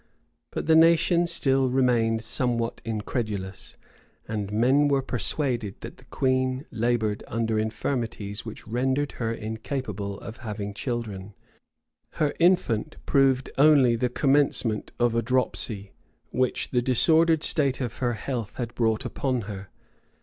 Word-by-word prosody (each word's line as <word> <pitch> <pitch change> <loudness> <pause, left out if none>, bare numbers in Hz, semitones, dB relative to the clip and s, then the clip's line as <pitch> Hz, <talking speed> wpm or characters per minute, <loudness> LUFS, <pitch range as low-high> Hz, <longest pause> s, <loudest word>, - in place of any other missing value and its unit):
But - - -4
the 160 - +4
nation 170 +1 +5
still 135 -5 +2
remained 120 -3 +2
somewhat 115 0 -1
incredulous; 105 -3 -4 0.5
and 105 -2 -3
men 130 +7 +3
were 140 -2 +1
persuaded 125 -4 -1
that - - -9
the - - -19
queen 130 +1 0
labored 110 -2 0
under 115 -1 -1
infirmities 110 -2 -3
which 110 -1 -9
rendered 130 +5 0
her 115 -1 0
incapable 110 -2 -4
of 115 - -9
having 105 -4 -5
children. 105 -4 -5 0.8
Her 150 -2 0
infant 160 -7 +2
proved 135 -2 +2
only 140 -5 +6
the 125 +2 0
commencement 135 -5 +1
of 120 -1 +2
a 115 - +2
dropsy, 115 -4 -1 0.4
which 130 0 -1
the 125 - +2
disordered 160 +6 +3
state 140 -4 +1
of 125 -5 -4
her 120 -2 0
health 115 -1 -4
had 120 -2 -4
brought 115 +1 0
upon 125 0 -1
her. 100 -2 -8
120 Hz, 130 wpm, -26 LUFS, 110-135 Hz, 0.8 s, only